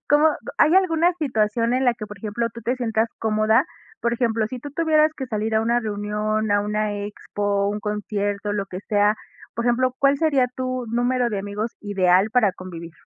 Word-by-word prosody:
Cómo 295 +2 +5 0.3
¿hay 310 +4 +5
alguna 350 -2 +3
situación 230 -4 +1
en 260 +1 +1
la 245 - +3
que, 215 -2 -7
por 210 -1 -10
ejemplo, 225 +3 -2
tú 235 - -10
te 245 +4 0
sientas 225 -2 0
cómoda? 220 +3 +3 0.4
Por 235 0 0
ejemplo, 230 -2 +1
si 255 - -6
tú 290 +4 -8
tuvieras 310 -1 +3
que 265 - -4
salir 220 -1 -2
a 220 - +4
una 235 +2 +2
reunión, 215 0 -2
a 205 0 +3
una 210 0 -1
expo, 205 0 -2
un 210 +1 -2
concierto, 205 -1 -2
lo 200 -1 -2
que 185 0 -7
sea, 205 0 +3 0.4
por 235 - -2
ejemplo, 255 +1 +2
¿cuál 275 0 +4
sería 285 -6 +3
tu 255 -1 -2
número 245 +1 +1
de 205 - -2
amigos 205 +3 -4
ideal 190 -1 +3
para 230 -5 +3
convivir? 170 -3 -9
220 Hz, 195 wpm, -23 LUFS, 205-250 Hz, 0.4 s, Cómo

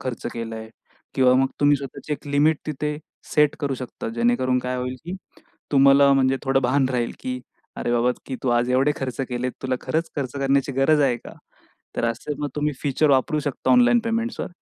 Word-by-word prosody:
खर्च 125 -3 -5
केलाय 115 -1 -6 0.5
किंवा 130 -1 +4
मग 135 +1 +3
तुम्ही 145 0 +5
स्वतःची 140 +2 -7
एक 145 - -5
लिमिट 145 +2 +3
तिथे 150 0 -3 0.4
सेट 150 -1 +4
करू 140 -2 -1
शकता. 125 -2 -6
जेणेकरून 120 +2 +1
काय 125 0 -3
होईल 125 +1 -3
की 175 +2 -5 0.6
तुम्हाला 140 0 +6
म्हणजे 135 -1 +3
थोडं 135 -1 +2
भान 130 +2 +2
राहील 120 -2 -1
की 125 0 -4 0.4
"अरे 120 - -2
बाबा 120 +1 +3 0.2
की 130 - -4
तू - - +1
आज 120 +1 0
एवढे 135 +3 +3
खर्च 130 -1 -4
केलेत. 125 0 -2
तुला 130 -1 0
खरंच 165 +1 -1
खर्च 130 -4 -3
करण्याची 140 0 +1
गरज 150 +3 +4
आहे 130 -4 +2
का?" - - -9 0.6
तर - - 0
असे 115 +5 -2
मग 145 - -2
तुम्ही 150 0 0
फीचर 145 +1 +2
वापरू 135 +3 +2
शकता 145 -1 -2
ऑनलाईन 245 -1 +5
पेमेंट्सवर. 230 +1 -2
135 Hz, 190 wpm, -23 LUFS, 125-145 Hz, 0.6 s, तुम्हाला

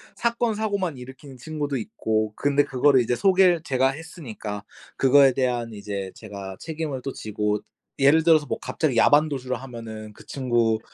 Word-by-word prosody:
사건 235 -1 0
사고만 200 -8 -2
일으키는 130 +2 -11
친구도 145 +1 -3
있고, 110 -1 -2
근데 145 0 +2
그거를 135 0 +3
이제 120 +1 0
소개를 185 -1 +4
제가 130 -2 +2
했으니까 125 - -7 0.3
그거에 135 0 +6
대한 120 -3 -1
이제 100 -2 -5
제가 100 -3 -8
책임을 155 -4 -4
또 135 - -3
지고. 105 0 -2 0.4
예를 150 +4 +5
들어서 160 -2 +5
뭐 - - -2
갑자기 150 -6 -1
야반도주를 140 -2 +3
하면은 110 -4 -8
그 - - -16
친구 120 -4 0
130 Hz, 355 characters per minute, -24 LUFS, 110-155 Hz, 0.4 s, 그거에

